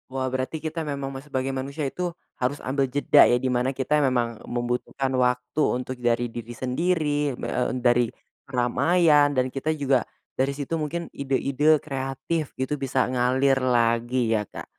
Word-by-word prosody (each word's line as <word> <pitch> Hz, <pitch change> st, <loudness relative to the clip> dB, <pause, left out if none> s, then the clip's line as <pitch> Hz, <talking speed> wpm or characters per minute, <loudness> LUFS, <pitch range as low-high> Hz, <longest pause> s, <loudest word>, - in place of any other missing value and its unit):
Wah 130 Hz, 0 st, -2 dB
berarti 130 Hz, +4 st, -2 dB
kita 160 Hz, +1 st, -3 dB
memang 140 Hz, -3 st, -4 dB
me 135 Hz, -, -5 dB
sebagai 135 Hz, -2 st, -3 dB
manusia 140 Hz, +3 st, -3 dB
itu, 175 Hz, +6 st, -2 dB, 0.3 s
harus 130 Hz, +3 st, 0 dB
ambil 135 Hz, 0 st, 0 dB
jeda 145 Hz, +2 st, +5 dB
ya, 120 Hz, -, +4 dB
di 130 Hz, +1 st, -1 dB
mana 125 Hz, +1 st, +1 dB
kita 150 Hz, +3 st, +1 dB
memang 120 Hz, -4 st, 0 dB
membutuhkan 125 Hz, +2 st, -2 dB
waktu 125 Hz, +3 st, +1 dB
untuk 125 Hz, 0 st, -1 dB
dari 120 Hz, 0 st, +1 dB
diri 120 Hz, 0 st, -7 dB
sendiri, 145 Hz, 0 st, 0 dB
b -, -, -10 dB
e -, -, -3 dB, 0.2 s
m 130 Hz, -, -2 dB
dari 120 Hz, -1 st, +4 dB, 0.4 s
keramaian, 145 Hz, +4 st, +3 dB
dan 130 Hz, 0 st, +3 dB
kita 140 Hz, +3 st, -2 dB
juga 135 Hz, -3 st, +2 dB, 0.3 s
dari 135 Hz, +1 st, 0 dB
situ 145 Hz, +2 st, -4 dB
mungkin 170 Hz, +3 st, -3 dB
ide-ide 140 Hz, +3 st, +2 dB
kreatif 135 Hz, +2 st, -4 dB
gitu 130 Hz, +2 st, -2 dB
bisa 135 Hz, -1 st, +1 dB
ngalir 130 Hz, +2 st, +2 dB
lagi 120 Hz, -1 st, +2 dB
ya, 110 Hz, -, +2 dB
Kak. -, -, -8 dB
130 Hz, 165 wpm, -25 LUFS, 125-145 Hz, 0.4 s, jeda